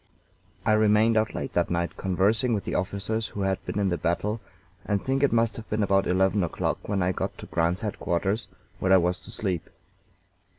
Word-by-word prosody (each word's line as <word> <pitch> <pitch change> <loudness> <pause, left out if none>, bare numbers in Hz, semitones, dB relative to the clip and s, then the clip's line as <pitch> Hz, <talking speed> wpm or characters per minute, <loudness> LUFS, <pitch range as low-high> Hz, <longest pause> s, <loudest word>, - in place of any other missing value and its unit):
I 110 - +3
remained 110 +1 +4
out 110 0 +1
late - - -4
that - - +1
night 85 -1 -1
conversing 105 +6 +1
with 100 - -2
the - - -4
officers 100 +4 -1
who 100 - -6
had 95 -1 0
been - - -3
in 100 -2 +2
the 85 - -1
battle, 105 +6 -1 0.4
and 105 -1 0
think 135 +5 -1
it 140 - +3
must 115 -1 +2
have 115 - -9
been 105 0 +1
about 95 -1 +2
eleven 95 +2 +2
o'clock 85 - -2
when 100 -3 +1
I 90 - +2
got - - -3
to - - -9
Grant's 85 +2 0
headquarters, 100 0 -1 0.3
where 95 - +1
I 95 - +8
was 90 0 +1
to - - -13
sleep. 95 -6 -3
100 Hz, 205 wpm, -26 LUFS, 90-110 Hz, 0.4 s, I